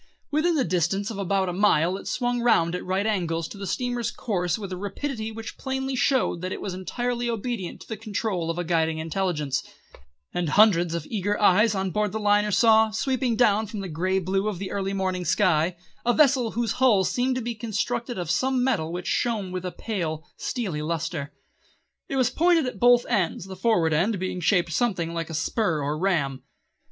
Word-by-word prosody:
Within 320 +3 +2
the 280 - +2
distance 185 +4 0
of 205 - -6
about 195 0 0
a 180 - -2
mile 180 -3 +3
it 195 - -8
swung 245 -1 -1
round 170 -8 +3
at 180 - -3
right 190 +2 -1
angles 170 -6 -1
to - - -9
the 200 - -5
steamer's 245 +2 -1
course 180 - -1
with 200 -3 -7
a - - -2
rapidity 220 +4 -4
which 225 0 -8
plainly 265 0 -2
showed 255 -9 +1
that 185 +1 -3
it - - -4
was 190 - -4
entirely 240 +6 -2
obedient 230 -4 -4
to - - -12
the 220 - -4
control 205 -5 -2
of 165 - -2
a 175 - -1
guiding 160 -2 +1
intelligence, 160 -4 -1 0.7
and 175 -3 -1
hundreds 175 -3 +4
of 165 -3 -4
eager 205 -1 -1
eyes 210 +2 +4
on 190 -1 -1
board 210 +1 0
the 220 - -2
liner 210 0 +3
saw, 220 +1 +5
sweeping 250 +2 0
down 220 -2 +3
from 210 0 -5
the 195 - -5
grey 185 +4 0
blue 190 +2 0
of 210 -4 -2
the 190 +1 -5
early 195 -1 -2
morning 185 -2 -1
sky, 175 -1 +2 0.3
a 240 - +3
vessel 265 -6 +4
whose 230 -2 0
hull 220 -7 +5
seemed 255 +6 0
to - - -1
be 235 +1 -2
constructed 230 +1 -3
of 175 -3 -2
some 260 +5 +1
metal 210 -12 0
which 180 +1 -5
shone 215 -6 -1
with 185 -1 -4
a 180 - -3
pale, 165 -9 -4
steely 190 -12 -3
lustre. 160 -2 -3 0.8
It - - -2
was 255 -2 +2
pointed 335 0 +3
at 255 - -5
both 245 0 +5
ends, 190 -6 0
the 190 0 -8
forward 180 -5 +2
end 195 +8 +1
being 185 0 -3
shaped 170 -2 +2
something 175 -6 0
like 165 -1 -3
a 160 - -5
spur 165 +1 0
or 145 +2 -1
ram. 155 -7 0
195 Hz, 205 wpm, -25 LUFS, 175-230 Hz, 0.8 s, saw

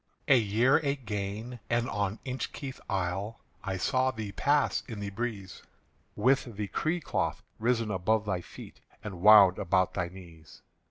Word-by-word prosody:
"A 140 - +7
year 115 +5 +3
again, 120 -5 -3
and 120 0 +1
on 100 -1 -2
Inchkeith 130 +1 -5
Isle 95 +3 -2 0.2
I 95 -1 -3
saw 130 +6 +1
thee 110 -5 -5
pass 145 +7 +1
in 110 -3 -6
the 100 -1 -4
breeze, 100 -4 -5 0.5
With 130 -4 +1
the 105 -2 -3
cerecloth 160 0 -1 0.2
risen 115 -1 +1
above 105 +3 +1
thy 95 -3 -1
feet - - -12 0.2
And 95 -5 -7
wound 100 -3 +8
about 95 0 +1
thy 90 -2 -1
knees. 85 -3 -14
105 Hz, 145 wpm, -29 LUFS, 95-125 Hz, 0.5 s, wound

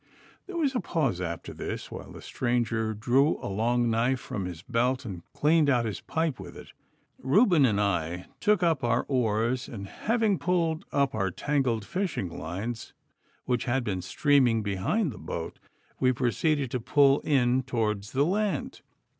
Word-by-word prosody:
There 380 -3 -5
was 290 -5 +1
a 250 - 0
pause 150 - -1
after 85 -2 -5
this, - - -5
while - - -8
the - - -11
stranger 115 -3 -1
drew 130 +8 +2
a - - -9
long 120 +4 +1
knife 120 +3 +1
from 100 -5 -5
his 90 -2 -7
belt, 125 +4 0
and 95 -6 -6
cleaned 155 0 +3
out 120 -3 +3
his 110 - -4
pipe 160 -6 -1
with 90 -2 -9
it. - - -12 0.5
Reuben 155 - +4
and 105 -3 +1
I 90 -3 -1
took 210 -3 +2
up 165 -6 +2
our 120 0 +1
oars, 120 0 0
and 100 -4 -7
having 220 - 0
pulled 165 -3 0
up 140 -1 +1
our 100 -3 0
tangled 125 0 0
fishing 180 - -2
lines, 100 +8 -5 0.5
which 125 -1 0
had 130 +1 0
been 95 -5 -2
streaming 120 +2 +3
behind 105 - 0
the - - -10
boat, - - -6 0.4
we 130 - +4
proceeded 130 +2 0
to 125 - -1
pull 140 +3 +4
in 130 -3 +2
towards 110 -4 -2
the 140 +2 +3
land. 195 -3 -1
125 Hz, 165 wpm, -28 LUFS, 110-150 Hz, 0.5 s, Reuben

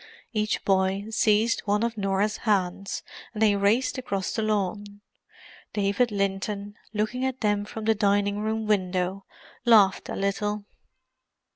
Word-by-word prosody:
Each 215 -1 -1
boy 190 +1 +2
seized 220 +1 +3
one 210 +1 +1
of 235 -1 -1
Norah's 200 +1 0
hands 195 -2 -1 0.3
and 215 - -4
they 210 -2 +5
raced 210 +7 +2
across 195 -6 -3
the 225 - -1
lawn. 205 -1 -2 0.7
David 205 +4 +1
Linton, 200 +1 -2 0.2
looking 215 +4 -1
at 260 0 -2
them 205 -1 +1
from 220 +1 -7
the 220 - +4
dining 205 -1 +1
room 220 +1 -1
window, 190 -2 0 0.4
laughed 215 -5 +5
a - - -3
little. 205 +1 -1
205 Hz, 135 wpm, -26 LUFS, 195-215 Hz, 0.7 s, they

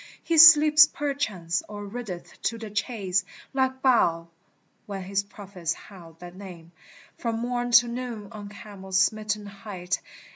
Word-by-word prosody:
" - - -30
He 325 - +5
sleeps 305 -2 +9
perchance, 215 - -3
or 205 -1 -7
rideth 200 -4 -8
to 230 - 0
the 220 -2 -8
chase, 200 -4 -1 0.3
Like 260 -1 -1
Baal, 170 -10 +2 0.6
when 195 -2 -6
his 195 +1 -1
prophets 195 -4 -6
howled 170 -5 -15
that 175 0 -10
name 180 -4 -11 0.5
From 230 -1 -2
morn 245 +1 -2
to 240 +1 +7
noon 235 -4 -6
on 205 -1 -9
Carmel's 195 -2 -6
smitten 210 +1 0
height." 195 -2 -5
205 Hz, 145 wpm, -25 LUFS, 190-240 Hz, 0.6 s, sleeps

